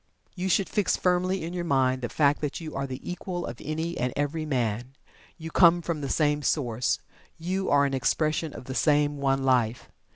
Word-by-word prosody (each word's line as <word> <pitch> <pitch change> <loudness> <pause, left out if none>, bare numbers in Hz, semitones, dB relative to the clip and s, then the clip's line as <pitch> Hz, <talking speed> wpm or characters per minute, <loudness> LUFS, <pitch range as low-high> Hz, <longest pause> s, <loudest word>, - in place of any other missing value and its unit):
You 185 0 -3
should 195 +1 +2
fix 210 - +1
firmly 180 0 +1
in 170 +2 -5
your 175 -1 -2
mind 130 -5 +1
the 120 - -3
fact 145 -1 +2
that 150 -2 -3
you 160 -2 -7
are 135 0 -2
the 130 -1 -7
Equal 180 0 -4
of 120 - -7
any 160 +3 -3
and 125 0 0
every 150 +2 -2
man. 120 -1 -2 0.4
You 160 0 -7
come 175 0 +5
from 160 -2 -2
the 140 - -3
same 150 0 +1
source. 125 -5 0 0.4
You 185 +3 -2
are 140 0 +4
an 140 - -1
expression 155 +4 0
of - - -9
the 130 - -5
same 145 +1 +2
One 135 -1 +1
Life. 125 -3 +1
150 Hz, 200 wpm, -27 LUFS, 130-170 Hz, 0.4 s, come